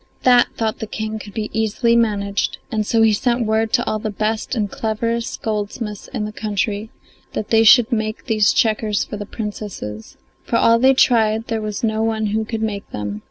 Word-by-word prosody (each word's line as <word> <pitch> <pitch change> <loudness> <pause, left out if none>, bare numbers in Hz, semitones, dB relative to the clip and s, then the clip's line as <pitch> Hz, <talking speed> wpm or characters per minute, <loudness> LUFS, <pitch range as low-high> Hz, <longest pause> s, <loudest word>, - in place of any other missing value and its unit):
That, 245 -1 +6
thought 220 -1 -1
the 220 - -4
King, 220 0 -4
could 205 -1 -11
be 215 -1 -3
easily 225 +2 +1
managed, 205 -3 0
and 215 -2 -1
so 225 -1 +3
he 220 -1 +5
sent 240 +2 +1
word 220 0 +1
to - - +3
all 215 - -1
the 215 - -3
best 215 +4 -2
and 210 -3 0
cleverest 230 +3 -2
goldsmiths 210 0 -4
in 210 - -4
the 210 - -5
country 210 0 -2 0.4
that 215 - -4
they 225 0 +5
should 240 +2 +7
make 220 -2 -2
these 215 -4 +3
checkers 215 -2 +1
for 210 - -7
the 205 -1 -7
Princesses. 205 - -6 0.3
For - - -2
all 230 0 +5
they 265 +2 +5
tried 225 -3 +3
there 225 -1 -1
was 210 0 -4
no 220 -1 +1
one 220 -1 0
who 220 0 0
could 220 0 -3
make 205 -2 -3
them. 105 0 -5
220 Hz, 200 wpm, -20 LUFS, 210-225 Hz, 0.4 s, should